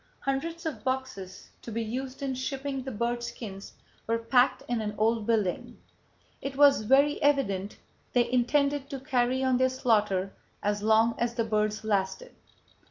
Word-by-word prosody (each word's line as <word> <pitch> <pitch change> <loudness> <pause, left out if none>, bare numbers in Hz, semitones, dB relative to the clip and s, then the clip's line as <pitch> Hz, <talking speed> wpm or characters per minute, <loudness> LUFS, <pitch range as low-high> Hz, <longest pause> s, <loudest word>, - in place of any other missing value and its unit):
Hundreds 325 +5 -3
of 315 - -4
boxes 260 -8 -4
to 235 - -8
be 230 +1 -2
used 260 +4 -5
in 270 -1 -1
shipping 270 +1 -3
the 265 +1 -6
bird 235 +2 -1
skins 205 -4 -7 0.3
were 230 0 +1
packed 245 +3 +2
in 240 -2 -1
an 210 -1 -3
old 225 0 +1
building. 215 -6 -1 0.6
It 275 0 -5
was 285 -4 +6
very 275 +6 +3
evident 210 -9 +1 0.4
they 245 -1 +3
intended 280 +3 +1
to 275 - -5
carry 260 -1 0
on 260 -1 +3
their 260 +1 +3
slaughter 210 -7 +1 0.3
as 205 0 0
long 220 +2 +4
as 235 0 -1
the 230 - +1
birds 215 -1 0
lasted. 210 - -1
240 Hz, 160 wpm, -28 LUFS, 215-270 Hz, 0.6 s, was